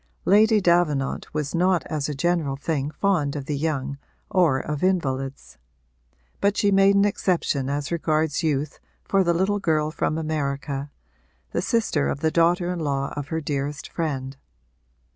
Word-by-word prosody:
Lady 215 +2 +5
Davenant 170 -7 +1
was 150 -2 -3
not 180 +1 +2
as 150 -2 -2
a 150 - -3
general 165 -2 0
thing 145 0 -2
fond 155 -5 0
of 140 -2 -4
the 150 - -2
young 140 -2 -2 0.3
or 165 -8 +3
of 150 0 -4
invalids; 135 - -1 0.8
but 200 +1 +1
she 205 - +3
made 195 0 +5
an 200 0 +5
exception 170 -9 0
as 145 +1 -2
regards 155 -2 0
youth 150 -2 -1 0.2
for 195 -1 +2
the 170 - +2
little 195 +4 +1
girl 155 -4 +1
from 155 -1 -1
America, 140 -2 -3 0.6
the - - -1
sister 220 - +1
of 145 - -3
the 160 - +2
daughter 175 +2 +2
in 175 - -4
law 140 -3 -2
of 145 -1 -4
her 160 +1 -2
dearest 145 0 -3
friend. 135 -5 -3
155 Hz, 160 wpm, -24 LUFS, 140-175 Hz, 0.8 s, Lady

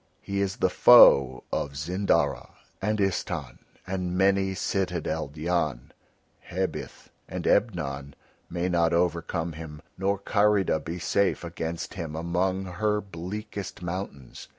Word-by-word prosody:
He 100 0 -3
is 95 -1 -1
the 95 - +2
foe 80 - +7
of 70 -1 -2
Zindara 80 -5 0 0.3
and 105 +2 0
Istahn 90 -7 -2 0.3
and 90 -1 -2
many 95 0 +2
citadeled 85 -6 -2
Yan, 75 -6 -1 0.5
Hebith 95 +1 -5 0.2
and - - -5
Ebnon 70 - 0 0.3
may 85 +1 -1
not 85 -2 +2
overcome 85 -1 0
him 75 -1 -8 0.2
nor 100 +1 +1
Karida 100 -4 +2
be 85 +2 -5
safe 95 +3 +1
against 85 0 -5
him 80 -6 -5
among 90 +3 -1
her 105 +4 0
bleakest 100 +1 -7
mountains. 85 -7 -6
90 Hz, 120 wpm, -27 LUFS, 80-95 Hz, 0.5 s, foe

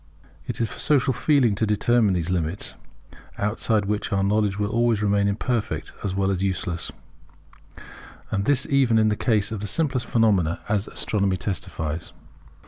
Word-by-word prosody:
It - - -4
is 115 - +1
for - - -10
social 135 -1 +2
feeling 135 -4 +3
to 110 +2 0
determine 105 -1 +2
these 85 0 -1
limits; 85 +1 -2 0.6
outside 105 0 0
which 105 +1 -2
our 100 -1 +1
knowledge 105 0 +1
will 105 0 -1
always 115 -2 +2
remain 100 0 +2
imperfect 110 +3 -2
as 95 -2 -2
well 100 0 +1
as 95 -1 -2
useless, 90 -3 -2 1.4
and 100 0 0
this 140 0 +2
even 135 -5 +3
in 110 -1 +4
the 105 - +1
case 110 -2 +1
of 110 - -3
the 105 - -4
simplest 130 +1 -1
phenomena; 100 -8 +2
as 105 0 0
astronomy 100 -3 0
testifies. 85 -4 -4
105 Hz, 160 wpm, -24 LUFS, 95-115 Hz, 1.4 s, in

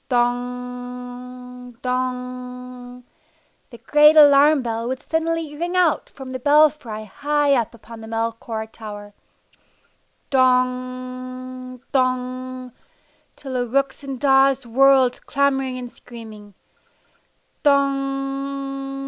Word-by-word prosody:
Dong! 250 0 -4
Dong! 250 0 -5 0.7
The 235 - -12
great 300 +5 +5
alarm 290 -1 +7
bell 230 0 -3
would 260 +1 -4
suddenly 325 -1 -2
ring 345 +4 -3
out 355 -4 +2
from 265 -1 -10
the 255 - -4
belfry 285 -6 +3
high 290 +6 +1
up 235 -3 0
upon 230 0 -12
the 220 - -9
Melchior 225 0 -3
Tower. 205 -2 -10 1.2
Dong! 255 0 -1
Dong! 255 -1 -1 0.6
Till 270 -2 -8
the 245 -1 -1
rooks 275 +4 0
and 270 -2 -5
daws 270 -1 +4
whirled 260 +1 +4
clamoring 270 -2 +1
and 245 -1 -7
screaming. 215 -4 -12 1.1
Dong! 275 -1 -1
255 Hz, 100 wpm, -22 LUFS, 245-275 Hz, 1.2 s, alarm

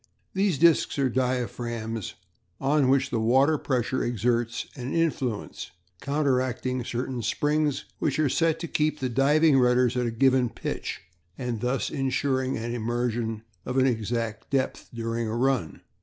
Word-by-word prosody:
These 195 -5 +1
discs 165 -1 +4
are 135 -2 +2
diaphragms 120 -3 -2 0.4
on 140 -1 +2
which 135 0 +2
the 115 - 0
water 135 +7 +3
pressure 130 -1 0
exerts 120 0 0
an 130 -1 -4
influence, 135 -9 -1 0.3
counteracting 130 -3 0
certain 125 0 -3
springs 145 +5 0
which 145 - 0
are 155 -1 +3
set 160 +4 +2
to 170 - -3
keep 155 0 0
the 130 - -2
diving 140 +3 +4
rudders 125 0 +3
at 125 -1 0
a - - -1
given 130 +1 +3
pitch, - - -5 0.4
and 120 -4 -3
thus 125 +2 -1
insuring 130 -1 0
an 115 +1 -3
immersion 120 -1 -2 0.2
of 125 - -3
an 130 - +5
exact 115 -2 -2
depth 135 -1 -1
during 115 0 -2
a 110 - -2
run. 130 -9 0
125 Hz, 145 wpm, -26 LUFS, 120-140 Hz, 0.4 s, an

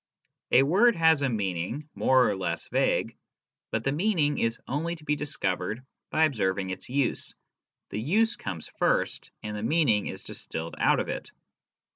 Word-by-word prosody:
A 130 - +6
word 205 - +4
has 160 -3 +4
a 140 - +2
meaning, 100 - -2
more 130 -1 +4
or 105 - 0
less 95 -1 -3
vague; - - +1 0.5
but 110 - -2
the 135 - +1
meaning 155 -2 +1
is 115 0 0
only 165 +5 -2
to 160 - -15
be 150 - +1
discovered 110 -5 -2 0.2
by 160 - +2
observing 95 -9 +1
its 95 - -7
use: 135 0 -1 0.6
the 105 - -3
use 220 - +2
comes 90 -6 -6
first, - - +1
and 105 0 -4
the 105 - -4
meaning 115 -5 +2
is - - -6
distilled 80 +1 -6
out - - +4
of - - -2
it. - - -5
130 Hz, 165 wpm, -27 LUFS, 105-155 Hz, 0.6 s, A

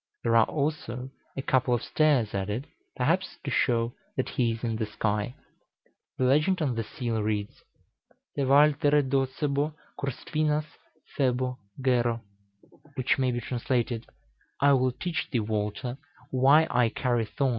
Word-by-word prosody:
There 115 0 +2
are 115 -1 +6
also 135 -4 -3 0.3
a 135 - -2
couple 130 -2 +2
of 120 - -3
stars 145 -8 +2
added, 105 +6 -2 0.3
perhaps 185 +5 0
to 140 - -3
show 120 -1 +1 0.2
that 130 - 0
he 120 -2 +1
is 115 +1 -6
in 115 -2 -1
the 110 -1 -2
sky. 105 +2 -1 0.8
The - - 0
legend 150 +8 +3
on 145 -6 0
the 115 -1 -2
seal 115 -2 -3
reads: 105 -1 -2 0.7
"Te - - -1
Waltere 145 +1 +4
docebo 140 +3 0 0.2
cur 140 -1 -1
spinas 150 +3 -1 0.5
phebo 130 -2 0 0.2
gero," 120 -3 +1 0.7
which 130 0 +1
may 130 -1 +2
be 120 -1 -1
translated, 120 -2 -1 0.5
"I 140 0 +5
will 130 -1 +3
teach 175 +6 -3
thee, 125 - 0
Walter, 110 +4 -3 0.3
why 140 +5 +5
I 125 -2 +3
carry 120 -1 0
thorns - - -18
in - - -20
the - - +3
moon." 135 - +3
130 Hz, 155 wpm, -28 LUFS, 115-140 Hz, 0.8 s, are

